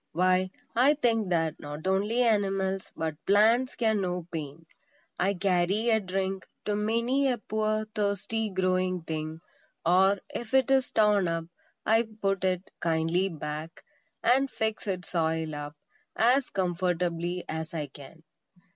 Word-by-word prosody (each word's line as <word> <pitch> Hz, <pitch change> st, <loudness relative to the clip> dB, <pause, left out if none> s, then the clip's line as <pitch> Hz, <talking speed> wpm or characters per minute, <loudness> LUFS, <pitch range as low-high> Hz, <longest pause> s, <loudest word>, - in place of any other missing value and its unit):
Why, 185 Hz, +2 st, +2 dB, 0.3 s
I 265 Hz, +6 st, +5 dB
think 225 Hz, -7 st, +1 dB
that 165 Hz, -3 st, 0 dB
not 150 Hz, +2 st, -7 dB
only 205 Hz, +6 st, +2 dB
animals, 195 Hz, -4 st, 0 dB
but 160 Hz, -1 st, -3 dB
plants 225 Hz, +6 st, +4 dB
can 220 Hz, -3 st, +1 dB
know 180 Hz, -2 st, -2 dB
pain. 155 Hz, 0 st, -6 dB, 0.5 s
I 195 Hz, +2 st, +2 dB
carry 190 Hz, +4 st, +1 dB
a 220 Hz, -, +4 dB
drink 190 Hz, -1 st, -3 dB, 0.2 s
to 210 Hz, -, 0 dB
many 235 Hz, +6 st, +1 dB
a 250 Hz, -2 st, +1 dB
poor, 215 Hz, 0 st, -1 dB
thirsty 210 Hz, +2 st, -1 dB
growing 185 Hz, -2 st, 0 dB
thing; 160 Hz, 0 st, -4 dB, 0.4 s
or, 190 Hz, +4 st, +5 dB, 0.2 s
if 240 Hz, +2 st, -3 dB
it 265 Hz, 0 st, +4 dB
is 265 Hz, -1 st, +3 dB
torn 210 Hz, -4 st, +3 dB
up 165 Hz, -1 st, -2 dB, 0.4 s
I 225 Hz, +1 st, +3 dB
put 195 Hz, -2 st, 0 dB
it 185 Hz, 0 st, -1 dB
kindly 165 Hz, +3 st, +1 dB
back, 155 Hz, 0 st, -6 dB, 0.4 s
and 265 Hz, +3 st, +4 dB
fix 220 Hz, -3 st, -2 dB
its 185 Hz, -2 st, -3 dB
soil 160 Hz, -2 st, 0 dB
up 145 Hz, 0 st, -6 dB, 0.4 s
as 250 Hz, +4 st, +3 dB
comfortably 175 Hz, -1 st, -1 dB
as 160 Hz, +1 st, -4 dB
I 155 Hz, -2 st, -2 dB
can. 145 Hz, +3 st, -14 dB
190 Hz, 140 wpm, -28 LUFS, 165-215 Hz, 0.5 s, I